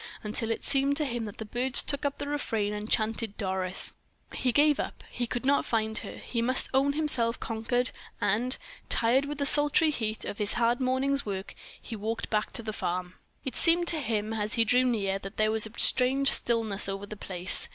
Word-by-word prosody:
until 220 +1 -4
it 225 - -3
seemed 280 0 +2
to 305 - +2
him 240 -4 -3
that 205 - -9
the 220 - -7
birds 250 +4 +5
took 280 0 -1
up 285 0 -2
the - - -6
refrain 225 -8 -2
and 210 +1 -6
chanted 220 -1 -1
"Doris!" 190 -2 0 0.4
He 255 - -1
gave 295 +3 +3
it - - +1
up; - - -10
he 240 - -3
could 245 +2 -4
not 280 +1 +2
find 220 -1 -1
her; - - -9
he 235 - -4
must 255 +3 +4
own 275 +2 +2
himself 260 -7 +2
conquered; 245 +2 -2 0.3
and, 245 +6 +1 0.3
tired 245 +4 +2
with 295 0 -5
the 285 - -1
sultry 295 +2 +5
heat 220 -6 -4
and 205 - -6
his 210 0 0
hard 240 +1 +1
morning's 265 +2 0
work, 195 -2 -6 0.3
he 230 - -8
walked 220 +2 -5
back 210 -1 -1
to 230 - -4
the 215 -1 -5
farm. 180 -1 -4 0.3
It 265 - -5
seemed 340 +1 +2
to 320 - +1
him, 220 -3 -2
as 210 -1 +1
he 230 - +2
drew 250 +3 +3
near, 200 -5 -1
that 195 0 -10
there 215 0 +1
was 220 0 +1
a 220 - -13
strange 265 +2 +4
stillness 220 -4 0
over 195 +1 -5
the 215 - -9
place. 185 -2 +2
230 Hz, 215 wpm, -27 LUFS, 210-270 Hz, 0.4 s, birds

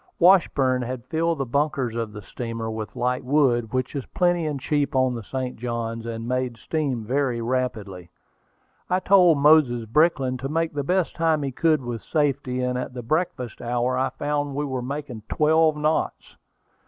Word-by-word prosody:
Washburn 150 - +4
had 125 0 -5
filled 165 +3 0
the 135 - -2
bunkers 135 -2 -1
of 115 -2 -3
the 105 0 -9
steamer 115 +2 -5
with 110 -1 -6
light 125 +1 -1
wood, 125 -4 +2
which 130 +2 -2
is 140 - -2
plenty 175 -2 +1
and 145 -2 -3
cheap 145 +1 -1
on 130 -1 +3
the 120 - -5
St. 130 +3 -4
Johns, 115 -1 -4
and 115 0 -5
made 125 -1 -1
steam 135 -6 -2
very 130 0 0
rapidly. 115 -8 -3 0.8
I 180 +1 +2
told 185 -4 +5
Moses 140 -5 +4
Brickland 130 0 +2
to 135 +2 -4
make 165 +1 -1
the 145 - -1
best 180 +4 0
time 160 -3 +1
he 135 - -2
could 155 +1 +2
with 120 -2 -4
safety, 140 -4 -1
and 125 0 -1
at 125 0 -6
the 125 - -5
breakfast 130 -3 -2
hour 120 +1 0
I 130 +1 +1
found 145 +1 -2
we 145 +1 -1
were 130 -3 -3
making 135 -2 -5
twelve 155 0 +3
knots. 155 +1 -1
130 Hz, 180 wpm, -24 LUFS, 120-150 Hz, 0.8 s, told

